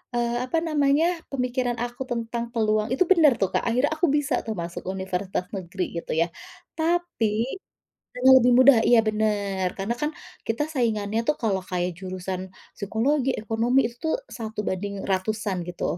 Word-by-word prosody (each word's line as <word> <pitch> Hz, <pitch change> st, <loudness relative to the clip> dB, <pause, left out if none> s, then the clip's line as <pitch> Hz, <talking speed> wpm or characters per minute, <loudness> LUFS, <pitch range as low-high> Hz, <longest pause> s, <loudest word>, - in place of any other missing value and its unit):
eee, 240 Hz, 0 st, 0 dB
apa 295 Hz, +6 st, -1 dB
namanya, 295 Hz, -1 st, +2 dB, 0.3 s
pemikiran 250 Hz, -2 st, -1 dB
aku 245 Hz, +2 st, -4 dB
tentang 235 Hz, 0 st, -3 dB
peluang 215 Hz, -1 st, +1 dB
itu 265 Hz, -, +3 dB
benar 315 Hz, -8 st, +6 dB
tuh, 195 Hz, -, +2 dB
Kak. -, -, +1 dB
Akhirnya 250 Hz, +5 st, +2 dB
aku 345 Hz, +2 st, +2 dB
bisa 290 Hz, -2 st, -1 dB
tuh 220 Hz, -, -2 dB
masuk 170 Hz, -1 st, -5 dB
universitas 190 Hz, -1 st, -3 dB
negeri 185 Hz, 0 st, -4 dB, 0.2 s
gitu -, -, -8 dB
ya. 170 Hz, -, +2 dB, 0.5 s
Tapi 320 Hz, -10 st, 0 dB, 0.7 s
karena 255 Hz, +1 st, +5 dB
lebih 250 Hz, 0 st, +4 dB
mudah, 260 Hz, -1 st, +8 dB
iya, 240 Hz, -1 st, +6 dB
benar, 205 Hz, -3 st, 0 dB
karena 195 Hz, +4 st, -3 dB
kan 300 Hz, +1 st, 0 dB, 0.4 s
kita 225 Hz, +6 st, 0 dB
saingannya 220 Hz, -5 st, 0 dB
tuh 300 Hz, -, +3 dB
kalau 205 Hz, -5 st, +1 dB
kayak 180 Hz, -1 st, -2 dB
jurusan 185 Hz, 0 st, -5 dB, 0.3 s
psikologi, 250 Hz, +7 st, 0 dB
ekonomi 230 Hz, +4 st, +1 dB
itu -, -, -18 dB
tuh 320 Hz, -, +2 dB, 0.2 s
1 220 Hz, -2 st, -6 dB
banding 200 Hz, +1 st, -3 dB
ratusan 200 Hz, +1 st, -1 dB
gitu. 175 Hz, -, -6 dB
225 Hz, 160 wpm, -25 LUFS, 195-255 Hz, 0.7 s, mudah